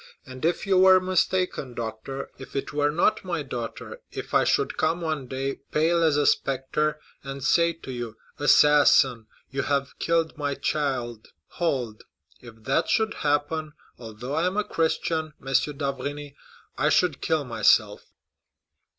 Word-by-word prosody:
And 130 Hz, 0 st, -10 dB
if 170 Hz, +1 st, 0 dB
you 190 Hz, -2 st, +3 dB
were 185 Hz, 0 st, +7 dB
mistaken, 185 Hz, -7 st, -1 dB
doctor—if 120 Hz, +4 st, -7 dB
it 135 Hz, -, -3 dB
were 145 Hz, 0 st, +2 dB
not 170 Hz, +7 st, +1 dB
my 170 Hz, -5 st, -3 dB
daughter—if 120 Hz, -4 st, -7 dB
I -, -, +5 dB
should -, -, +1 dB
come 160 Hz, +2 st, 0 dB
one 155 Hz, -5 st, -3 dB
day, 135 Hz, +1 st, -3 dB
pale 165 Hz, +2 st, +2 dB
as 160 Hz, -3 st, +3 dB
a 145 Hz, -, +2 dB
spectre, 145 Hz, +3 st, 0 dB, 0.2 s
and 135 Hz, -1 st, -7 dB
say 170 Hz, +4 st, +3 dB
to 160 Hz, -5 st, -10 dB
you, 120 Hz, -3 st, -6 dB, 0.2 s
'Assassin, 145 Hz, -5 st, +5 dB, 0.2 s
you 140 Hz, +1 st, -1 dB
have 140 Hz, -1 st, -2 dB
killed 165 Hz, -1 st, 0 dB
my 145 Hz, -1 st, -1 dB
child!'—hold—if 120 Hz, -, -4 dB
that 130 Hz, +5 st, 0 dB
should 220 Hz, -1 st, +1 dB
happen, 150 Hz, +1 st, -1 dB, 0.3 s
although 115 Hz, +3 st, -7 dB
I 165 Hz, +4 st, +1 dB
am 185 Hz, +3 st, -2 dB
a 210 Hz, -, +2 dB
Christian, 160 Hz, -2 st, -1 dB
M. -, -, -15 dB, 0.3 s
d'Avrigny, 140 Hz, +1 st, -4 dB, 0.5 s
I 150 Hz, +3 st, +3 dB
should 160 Hz, -4 st, +2 dB
kill 155 Hz, -2 st, 0 dB
myself." 120 Hz, -2 st, +2 dB
145 Hz, 140 wpm, -25 LUFS, 130-160 Hz, 0.5 s, were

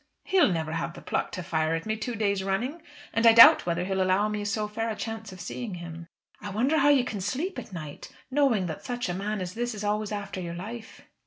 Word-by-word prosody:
He'll 375 Hz, -, +3 dB
never 160 Hz, -2 st, -2 dB
have 170 Hz, +1 st, -3 dB
the -, -, -10 dB
pluck -, -, -2 dB
to 180 Hz, -, -4 dB
fire 160 Hz, -2 st, 0 dB
at 165 Hz, -, -4 dB
me 220 Hz, 0 st, -1 dB
two 225 Hz, +2 st, -4 dB
days 200 Hz, -2 st, 0 dB
running. 240 Hz, -, -2 dB, 0.3 s
And 230 Hz, +1 st, +4 dB
I 225 Hz, -, +9 dB
doubt 230 Hz, -5 st, +9 dB
whether 170 Hz, +1 st, 0 dB
he'll 190 Hz, 0 st, -1 dB
allow 185 Hz, +3 st, +2 dB
me 210 Hz, -1 st, -3 dB
so 210 Hz, 0 st, -1 dB
fair 225 Hz, +2 st, -3 dB
a 220 Hz, -, -2 dB
chance 225 Hz, -1 st, -6 dB
of 185 Hz, -, -11 dB
seeing 225 Hz, -2 st, -5 dB
him." 170 Hz, -1 st, -8 dB, 0.3 s
"I 205 Hz, -, -5 dB
wonder 255 Hz, +10 st, +1 dB
how 285 Hz, +1 st, +5 dB
you 280 Hz, -3 st, +5 dB
can 210 Hz, -5 st, -4 dB
sleep 290 Hz, -, -2 dB
at -, -, -10 dB
night, 155 Hz, -5 st, -8 dB, 0.2 s
knowing 260 Hz, -9 st, +2 dB
that 160 Hz, -3 st, -6 dB
such 245 Hz, -5 st, -3 dB
a -, -, -1 dB
man 200 Hz, +2 st, -3 dB
as 180 Hz, 0 st, -4 dB
this 240 Hz, +1 st, -3 dB
is 210 Hz, -, -6 dB
always 210 Hz, 0 st, -1 dB
after 200 Hz, -2 st, -4 dB
your 170 Hz, -1 st, -5 dB
life." 220 Hz, +6 st, -8 dB
205 Hz, 245 wpm, -27 LUFS, 180-230 Hz, 0.3 s, I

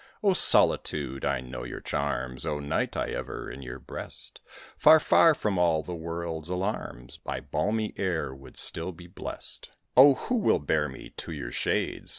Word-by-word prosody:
O 200 Hz, -2 st, +5 dB
Solitude! 65 Hz, -, +3 dB
I 70 Hz, -2 st, 0 dB
know 65 Hz, 0 st, -7 dB
your -, -, -6 dB
charms! 65 Hz, 0 st, -2 dB
O 75 Hz, -2 st, -1 dB
Night! 70 Hz, 0 st, -1 dB
I -, -, -1 dB
ever -, -, -5 dB
in 70 Hz, -, -9 dB
your 65 Hz, -1 st, -7 dB
breast, 60 Hz, -, -7 dB, 0.3 s
Far, 160 Hz, -, +7 dB
far 160 Hz, +1 st, +5 dB
from 105 Hz, -9 st, -1 dB
all 80 Hz, -3 st, +3 dB
the 90 Hz, -, -6 dB
world's 85 Hz, -1 st, -4 dB
alarms, 90 Hz, -, -4 dB
By -, -, -4 dB
balmy 110 Hz, 0 st, -1 dB
air 85 Hz, -8 st, -1 dB
would 65 Hz, 0 st, -14 dB
still 80 Hz, +3 st, 0 dB
be 85 Hz, 0 st, -13 dB
blest; 90 Hz, +2 st, -7 dB, 0.3 s
Oh, 135 Hz, +2 st, +9 dB
who 250 Hz, -, -2 dB
will 215 Hz, -, +3 dB
bear 75 Hz, +1 st, 0 dB
me -, -, -10 dB
to -, -, -6 dB
your -, -, -5 dB
shades? -, -, -1 dB
85 Hz, 170 wpm, -28 LUFS, 70-100 Hz, 0.3 s, Oh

